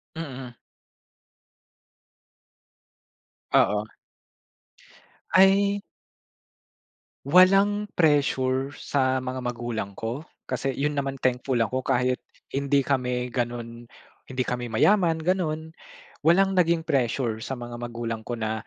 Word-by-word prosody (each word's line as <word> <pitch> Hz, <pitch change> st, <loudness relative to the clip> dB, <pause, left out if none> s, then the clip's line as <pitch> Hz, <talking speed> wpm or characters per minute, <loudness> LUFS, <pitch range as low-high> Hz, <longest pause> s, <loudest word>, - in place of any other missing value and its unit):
Mhm. 135 Hz, -6 st, -7 dB, 3.0 s
Oo. 105 Hz, +1 st, +3 dB, 1.4 s
Ay 200 Hz, +2 st, +5 dB, 1.5 s
Walang 195 Hz, +5 st, +5 dB
pressure 135 Hz, -4 st, +2 dB
sa 130 Hz, -2 st, +1 dB
mga 130 Hz, 0 st, -5 dB
magulang 120 Hz, -4 st, -3 dB
ko? 115 Hz, +8 st, -5 dB, 0.2 s
Kasi 135 Hz, -, -1 dB
yun 145 Hz, +3 st, -1 dB
naman 135 Hz, -1 st, -2 dB
thankful 125 Hz, 0 st, 0 dB
ako 130 Hz, +3 st, 0 dB
kahit 125 Hz, -1 st, 0 dB, 0.2 s
hindi 140 Hz, +1 st, +1 dB
kami 125 Hz, -2 st, -1 dB
ganon 120 Hz, -1 st, -4 dB, 0.4 s
hindi 130 Hz, -1 st, -3 dB
kami 125 Hz, -1 st, -3 dB
mayaman 165 Hz, -, +3 dB
ganon. 160 Hz, -2 st, -1 dB, 0.5 s
Walang 190 Hz, +3 st, +4 dB
naging 170 Hz, -1 st, +3 dB
pressure 125 Hz, -5 st, 0 dB
sa 125 Hz, +4 st, -5 dB
mga 120 Hz, -1 st, -7 dB
magulang 115 Hz, -2 st, -5 dB
ko 120 Hz, -, -3 dB
na 110 Hz, -1 st, -3 dB
130 Hz, 95 wpm, -25 LUFS, 120-160 Hz, 3.0 s, Ay